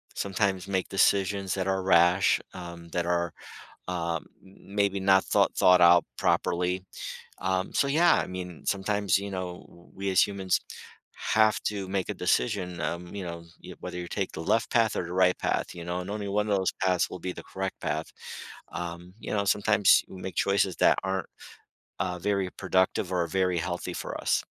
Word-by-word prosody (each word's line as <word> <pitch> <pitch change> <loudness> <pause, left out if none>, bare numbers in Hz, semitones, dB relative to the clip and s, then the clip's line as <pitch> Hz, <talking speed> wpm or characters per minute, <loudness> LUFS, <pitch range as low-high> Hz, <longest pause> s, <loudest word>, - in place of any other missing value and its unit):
sometimes, 100 -1 -1
make, 95 -1 -1
decisions 95 0 +2
that 95 -1 -2
are 95 0 0
rash, 90 +1 +4
um, 85 -1 -9
that 85 +1 -1
are, 85 -1 0 0.6
um, 85 -2 -2 0.2
m 95 +1 -16
maybe 100 -1 +2
not 95 0 +4
thought - - +2
thought 90 0 +6
out 85 0 +7
properly. 90 +1 +1 0.6
Um, 95 0 -1
so, 140 - +2
yeah, 165 +5 +5
I - - 0
mean, 90 -3 -7
sometimes, 100 -1 +1
you 100 0 -5
know, 90 -1 -5
w 85 - -19
we 100 0 -3
as 95 - +5
humans 95 -2 0 0.7
have 110 0 +4
to 100 -2 -2
make 95 0 -2
a - - 0
decision, 90 -2 0
um, 85 +4 -4
you 100 - -4
know, 85 -1 -7
you - - -10
whether 90 0 -6
you 90 - -5
take 95 +1 -3
the 80 - -5
left 115 +6 +1
path, 115 -3 +3
or 85 - -1
the 85 - -6
right 90 0 +3
path, - - -1
you 85 - -7
know, 90 +1 -2
and 90 - -8
only 105 0 -3
one 105 +2 0
of 100 - +3
those 95 -1 0
paths 90 -2 +2
will 90 - -7
be 90 +1 -4
the - - -9
correct 95 0 -3
path. 75 +1 -2 0.7
Um, 85 +2 -6
you - - -6
know, 100 -1 +1
sometimes, 105 0 +4
we 95 - -10
make 95 - -6
choices 100 -2 +2
that - - +4
aren't, 95 0 -2 0.7
uh, 90 0 -2
very 100 -1 0
productive, 95 0 0
or 85 -2 +1
very 90 +1 +1
healthy 90 +1 -3
for - - -5
us. - - +1
95 Hz, 190 wpm, -28 LUFS, 90-100 Hz, 0.7 s, out